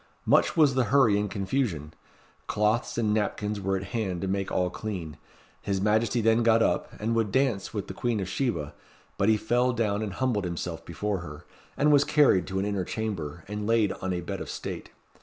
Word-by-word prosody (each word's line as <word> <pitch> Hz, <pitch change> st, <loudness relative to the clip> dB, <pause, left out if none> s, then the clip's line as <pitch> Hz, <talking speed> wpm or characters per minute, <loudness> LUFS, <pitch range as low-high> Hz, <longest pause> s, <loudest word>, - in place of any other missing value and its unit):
Much -, -, +3 dB
was 150 Hz, -4 st, +5 dB
the 130 Hz, -2 st, +2 dB
hurry 130 Hz, -6 st, +4 dB
and 105 Hz, 0 st, -1 dB
confusion. 95 Hz, -, -2 dB, 0.5 s
Cloths 105 Hz, +4 st, 0 dB
and 110 Hz, -3 st, +1 dB
napkins 105 Hz, -1 st, -1 dB
were 95 Hz, 0 st, 0 dB
at 95 Hz, -, -5 dB
hand 100 Hz, -7 st, -1 dB
to 95 Hz, -, -2 dB
make 95 Hz, 0 st, -2 dB
all 90 Hz, -1 st, 0 dB
clean. 90 Hz, -9 st, -5 dB, 0.5 s
His 100 Hz, -1 st, -1 dB
Majesty 110 Hz, +4 st, +2 dB
then 115 Hz, +1 st, +3 dB
got 115 Hz, -1 st, +4 dB
up, -, -, 0 dB
and 110 Hz, +2 st, -1 dB
would 115 Hz, -3 st, +1 dB
dance 130 Hz, -7 st, +1 dB
with 105 Hz, -3 st, -3 dB
the -, -, -6 dB
Queen 115 Hz, +2 st, -1 dB
of 95 Hz, -, -3 dB
Sheba; 95 Hz, -, -2 dB, 0.5 s
but 100 Hz, -, +3 dB
he 110 Hz, -, +4 dB
fell 120 Hz, +4 st, +1 dB
down 105 Hz, -3 st, 0 dB
and 105 Hz, -3 st, -3 dB
humbled 115 Hz, -4 st, 0 dB
himself 85 Hz, -1 st, -4 dB
before 100 Hz, +3 st, -3 dB
her, 75 Hz, -1 st, -9 dB, 0.3 s
and 150 Hz, +1 st, +4 dB
was 145 Hz, -1 st, +6 dB
carried 145 Hz, -12 st, +4 dB
to 95 Hz, -, -3 dB
an 95 Hz, -, 0 dB
inner 100 Hz, -2 st, -1 dB
chamber, 85 Hz, -7 st, -4 dB
and 105 Hz, +1 st, -4 dB
laid 115 Hz, -3 st, +3 dB
on 95 Hz, -, -2 dB
a 90 Hz, -1 st, -2 dB
bed 85 Hz, -, -5 dB
of -, -, -6 dB
state. -, -, -6 dB
105 Hz, 205 wpm, -27 LUFS, 95-115 Hz, 0.5 s, was